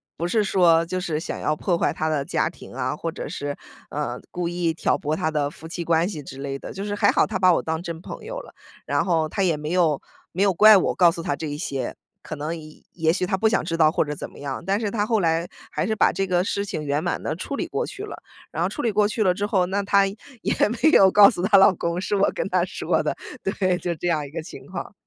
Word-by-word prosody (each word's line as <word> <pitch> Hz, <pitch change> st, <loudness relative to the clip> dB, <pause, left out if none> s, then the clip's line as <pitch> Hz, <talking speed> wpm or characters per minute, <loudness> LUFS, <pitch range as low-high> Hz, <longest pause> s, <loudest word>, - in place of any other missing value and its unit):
不 170 Hz, -, -3 dB
是 210 Hz, +4 st, +1 dB
说， 170 Hz, -4 st, +4 dB
就 185 Hz, +2 st, -3 dB
是 165 Hz, -4 st, -2 dB
想 160 Hz, -, -5 dB
要 150 Hz, -, +1 dB
破 175 Hz, 0 st, 0 dB
坏 145 Hz, -, +1 dB
她 155 Hz, +1 st, -2 dB
的 155 Hz, -3 st, 0 dB
家 -, -, 0 dB
庭 -, -, -13 dB
啊， -, -, -2 dB
或 -, -, -4 dB
者 -, -, -6 dB
是， 145 Hz, 0 st, -4 dB, 0.3 s
呃， -, -, -3 dB
故 175 Hz, -1 st, -2 dB
意 170 Hz, -1 st, -1 dB
挑 160 Hz, -, +1 dB
拨 150 Hz, +1 st, -2 dB
她 155 Hz, 0 st, 0 dB
的 150 Hz, -2 st, 0 dB
夫 160 Hz, -, -11 dB
妻 170 Hz, +1 st, -5 dB
关 165 Hz, +1 st, +2 dB
系 160 Hz, -8 st, -6 dB
之 135 Hz, -, -10 dB
类 135 Hz, 0 st, -4 dB
的。 -, -, -9 dB
就 195 Hz, +1 st, -5 dB
是 205 Hz, 0 st, -2 dB
还 -, -, +4 dB
好 -, -, +3 dB
她 -, -, -2 dB
把 185 Hz, -1 st, +5 dB
我 -, -, +1 dB
当 160 Hz, +1 st, -3 dB
真 170 Hz, -2 st, -5 dB
朋 -, -, -9 dB
友 -, -, -5 dB
了， -, -, -12 dB, 0.3 s
然 -, -, +1 dB
后 165 Hz, -4 st, +1 dB
她 195 Hz, +5 st, -1 dB
也 170 Hz, -4 st, +2 dB
没 150 Hz, +1 st, -5 dB
有 170 Hz, -5 st, +2 dB, 0.3 s
没 185 Hz, -, -3 dB
有 200 Hz, -1 st, +4 dB
怪 215 Hz, +3 st, +8 dB
我 185 Hz, -, 0 dB
告 175 Hz, -2 st, +6 dB
诉 165 Hz, -, -6 dB
她 180 Hz, -, -1 dB
这 160 Hz, -, -5 dB
一 145 Hz, 0 st, -4 dB
些， 135 Hz, -5 st, -3 dB, 0.3 s
可 155 Hz, -, -6 dB
能 155 Hz, +3 st, -3 dB
也 155 Hz, -1 st, -13 dB
也 160 Hz, -2 st, +2 dB
许 185 Hz, -, 0 dB
她 180 Hz, -, 0 dB
不 220 Hz, -, +3 dB
想 225 Hz, -, +1 dB
知 165 Hz, 0 st, -2 dB
道 155 Hz, -2 st, +5 dB
或 -, -, +2 dB
者 150 Hz, 0 st, -4 dB
怎 -, -, -7 dB
么 -, -, -15 dB
样。 140 Hz, -1 st, -5 dB
但 195 Hz, +2 st, +1 dB
是 215 Hz, -2 st, -1 dB
她 205 Hz, -1 st, 0 dB
后 220 Hz, 0 st, +1 dB
来 165 Hz, -1 st, +1 dB, 0.2 s
还 -, -, -1 dB
是 220 Hz, -, 0 dB
把 210 Hz, -, +4 dB
这 195 Hz, -, 0 dB
个 180 Hz, -1 st, +2 dB
事 200 Hz, +1 st, -1 dB
情 195 Hz, -7 st, -4 dB
圆 145 Hz, +2 st, 0 dB
满 -, -, -2 dB
地 155 Hz, -, -2 dB
处 235 Hz, -, -5 dB
理 -, -, -2 dB
过 -, -, -2 dB
去 400 Hz, -, -8 dB
了， 420 Hz, -, -8 dB, 0.3 s
然 -, -, -3 dB
后 -, -, +1 dB
处 295 Hz, -, -5 dB
理 230 Hz, -, +1 dB
过 210 Hz, +1 st, +3 dB
去 215 Hz, +1 st, -3 dB
了 185 Hz, -3 st, +3 dB
之 200 Hz, +3 st, -2 dB
后， 195 Hz, -3 st, +2 dB
那 200 Hz, +2 st, 0 dB
她 200 Hz, 0 st, +4 dB
也 225 Hz, +5 st, -5 dB, 0.3 s
没 315 Hz, -, +5 dB
有 190 Hz, -9 st, +7 dB
告 205 Hz, 0 st, +8 dB
诉 -, -, -4 dB
她 200 Hz, +1 st, +5 dB
老 195 Hz, 0 st, +7 dB
公 170 Hz, +1 st, -2 dB
是 205 Hz, -, -1 dB
我 200 Hz, 0 st, +3 dB
跟 -, -, -2 dB
她 -, -, +2 dB
说 -, -, -1 dB
的， -, -, -1 dB, 0.3 s
对， 185 Hz, -2 st, 0 dB
就 175 Hz, -1 st, -2 dB
这 175 Hz, -, -4 dB
样 155 Hz, -4 st, 0 dB
一 -, -, -9 dB
个 165 Hz, +1 st, -4 dB
情 165 Hz, -, -11 dB
况， 185 Hz, 0 st, -6 dB
175 Hz, 305 characters per minute, -23 LUFS, 160-200 Hz, 0.3 s, 怪